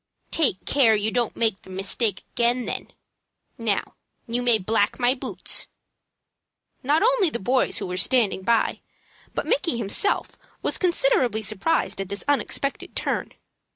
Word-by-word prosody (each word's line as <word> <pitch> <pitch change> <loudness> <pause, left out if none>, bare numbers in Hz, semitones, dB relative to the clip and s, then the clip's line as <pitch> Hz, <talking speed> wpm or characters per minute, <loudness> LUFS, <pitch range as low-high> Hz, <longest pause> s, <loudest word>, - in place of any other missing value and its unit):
"Take 270 - +1
care 240 -6 +4
you 210 +1 0
don't 240 -1 0
make 220 -4 0
the - - -16
mistake 195 +2 -1
again, 240 +1 +1
then. - - -4 0.7
Now - - -1 0.3
you 240 +1 -1
may 240 -2 +4
black 210 +1 0
my 245 0 +3
boots." 265 - -2 1.1
Not 295 +7 +2
only 470 -6 +3
the 265 - -3
boys 250 +5 +1
who - - -3
were 180 0 -4
standing 225 -4 +2
by, 230 +3 +1 0.5
but - - -2
Micky 360 - +1
himself, 230 - +1 0.2
were - - +1
considerably 355 - +2
surprised 215 +2 0
at 195 - -6
this 200 0 -3
unexpected 280 -1 -1
turn. - - -2
235 Hz, 145 wpm, -24 LUFS, 210-275 Hz, 1.1 s, care